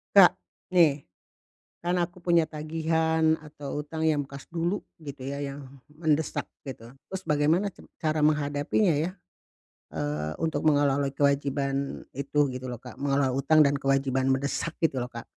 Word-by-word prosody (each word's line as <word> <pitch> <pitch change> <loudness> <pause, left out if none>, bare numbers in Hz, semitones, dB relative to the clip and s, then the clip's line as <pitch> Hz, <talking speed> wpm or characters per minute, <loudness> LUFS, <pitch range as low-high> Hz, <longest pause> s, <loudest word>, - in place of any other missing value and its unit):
Kak - - +9 0.4
nih, 150 -5 +4 0.7
kan 175 +1 0
aku 175 0 -2
punya 170 -2 +3
tagihan 160 +1 +1
atau 145 -2 -6
utang 160 +2 -4
yang 155 -2 +3
bekas 140 0 -9
dulu 170 +4 -1 0.2
gitu 140 -3 -8
ya, 140 +1 -4
yang 140 -1 -7
mendesak 155 0 0 0.2
gitu. 120 -2 -8 0.2
Terus 190 0 -5
bagaimana 155 +7 +2
ca - - -18 0.2
cara 155 -1 0
menghadapinya 150 +5 +2
ya, 160 +6 -1 0.8
eee, 75 +1 -2
untuk 160 -3 -1
mengelola 145 -1 +3
kewajiban 140 0 0
itu 140 +1 0
gitu 130 0 -6
lho 125 - -4
Kak, 125 +2 -12
mengelola 140 -1 +2
utang 150 +4 +5
dan 140 0 +1
kewajiban 135 -1 +1
mendesak 140 +4 -1
gitu 135 -5 +1
lho 125 - -3
Kak. 115 -1 -8
145 Hz, 150 wpm, -27 LUFS, 135-160 Hz, 0.8 s, Kak